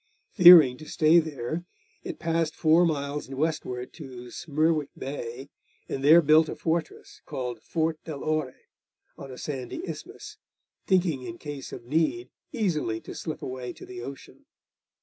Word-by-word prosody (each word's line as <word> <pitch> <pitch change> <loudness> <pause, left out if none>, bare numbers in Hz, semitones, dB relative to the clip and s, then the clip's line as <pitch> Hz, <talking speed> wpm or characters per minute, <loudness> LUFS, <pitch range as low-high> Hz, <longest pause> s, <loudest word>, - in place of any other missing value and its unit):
Fearing 170 - +9
to 155 - -11
stay 160 +2 +5
there, 155 0 -4 0.4
it - - -6
passed 165 -1 -1
four 165 +2 +4
miles 145 -2 -3
westward 135 -3 -3
to 125 -6 -10
Smerwick 155 -1 0
Bay, 135 -1 -6 0.4
and 135 - -4
there 160 +4 +7
built 155 +1 +5
a - - -4
fortress 165 -1 -3
called 125 -3 -5
Fort 160 -1 -2
del 150 -4 -6
Ore, 155 -4 -1 0.6
on 135 - -10
a 130 - -9
sandy 145 - -5
isthmus, - - -8 0.5
thinking 175 -8 +2
in 170 +7 -7
case 145 -4 -8
of - - -9
need 165 - 0 0.2
easily 165 - -1
to - - -10
slip 155 - -6
away 130 -1 -5
to - - -12
the 125 -1 -8
ocean. 135 +3 -10
155 Hz, 150 wpm, -27 LUFS, 130-165 Hz, 0.6 s, Fearing